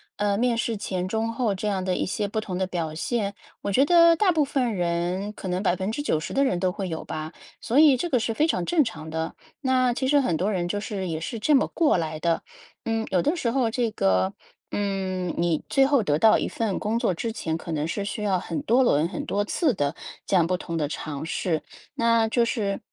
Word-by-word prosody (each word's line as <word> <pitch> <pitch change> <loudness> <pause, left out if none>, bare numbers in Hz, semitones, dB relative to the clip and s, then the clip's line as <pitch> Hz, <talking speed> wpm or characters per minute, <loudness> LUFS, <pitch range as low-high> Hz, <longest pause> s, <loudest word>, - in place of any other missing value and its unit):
呃， 205 -1 0
面 240 0 +1
试 230 -2 -1
前 185 -3 -3
中 225 +3 -1
后 230 -4 0
这 200 +3 -3
样 195 -2 -1
的 185 0 0
一 - - 0
些 205 +2 -2
不 215 +2 -2
同 190 -4 -4
的 190 - 0
表 165 -4 -3
现， 205 +3 -1 0.3
我 200 - -3
觉 255 +7 +4
得 335 0 +6
大 380 0 +3
部 310 -3 +2
分 255 -5 0
人 175 +3 -1
可 190 - -6
能 180 +1 -1
90% 190 - -1
的 275 +1 +3
人 180 - +1
都 185 0 +1
会 190 0 -4
有 160 -2 -4
吧， 155 +1 -6 0.3
所 255 +6 +1
以 290 -4 +6
这 345 +7 -2
个 255 - +3
是 225 - -1
非 305 +8 +2
常 180 - 0
正 335 - +2
常 160 -7 -6
的， 160 0 -3 0.2
那 255 -3 +2
其 260 +1 -1
实 285 0 +4
很 170 -11 0
多 190 +5 0
人 175 -4 -1
就 205 - -1
是 195 -4 -4
也 160 -1 -2
是 230 +8 -5
这 290 +8 +2
么 270 - +4
过 320 - +2
来 155 -2 -2
的。 170 -1 +1 0.4
嗯， 225 -1 -1
有 180 -2 +3
的 310 +5 +1
时 235 -8 -1
候 250 -3 +1
这 230 -1 -1
个 95 - +1 0.4
嗯， 190 -3 -2
你 170 -2 +1
最 270 -1 +4
后 275 -3 +3
得 150 -7 +1
到 215 +7 +5
一 - - -1
份 220 -4 -2
工 215 +2 -1
作 190 - +1
之 225 +6 -3
前， 160 -7 -2
可 165 0 -6
能 150 0 -1
是 200 +4 -3
需 210 0 -4
要 190 -3 +1
很 165 -2 -4
多 245 +4 +3
轮、 160 - +2
很 - - -5
多 205 +1 0
次 280 - +1
的 145 -5 -1 0.3
这 - - -4
样 165 - +3
不 180 - +1
同 170 -2 -4
的 150 -2 0
尝 150 0 -5
试。 165 -1 -1 0.3
那 230 -1 +3
就 235 0 +2
是 200 -4 -1
200 Hz, 255 characters per minute, -25 LUFS, 175-235 Hz, 0.4 s, 得